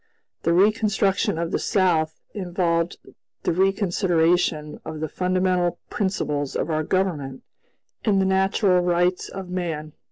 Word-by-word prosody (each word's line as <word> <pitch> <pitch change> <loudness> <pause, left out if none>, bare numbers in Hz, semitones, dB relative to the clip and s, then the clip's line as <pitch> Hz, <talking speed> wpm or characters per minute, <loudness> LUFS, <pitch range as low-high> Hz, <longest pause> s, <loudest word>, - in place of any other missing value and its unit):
The 170 - +1
reconstruction 200 -2 +2
of 170 0 -2
the - - 0
South 165 -5 +1
involved 175 -3 -1 0.5
the - - +1
reconsideration 175 -4 +1
of 155 - -6
the 155 - -2
fundamental 180 +1 0
principles 150 -8 -1
of 165 - -1
our 155 0 +1
Government 155 -7 -1 0.6
and 205 -3 +3
the 190 - +2
natural 190 0 +3
rights 175 +1 +1
of 190 -2 -7
man. 160 -4 -3
180 Hz, 125 wpm, -23 LUFS, 165-190 Hz, 0.6 s, and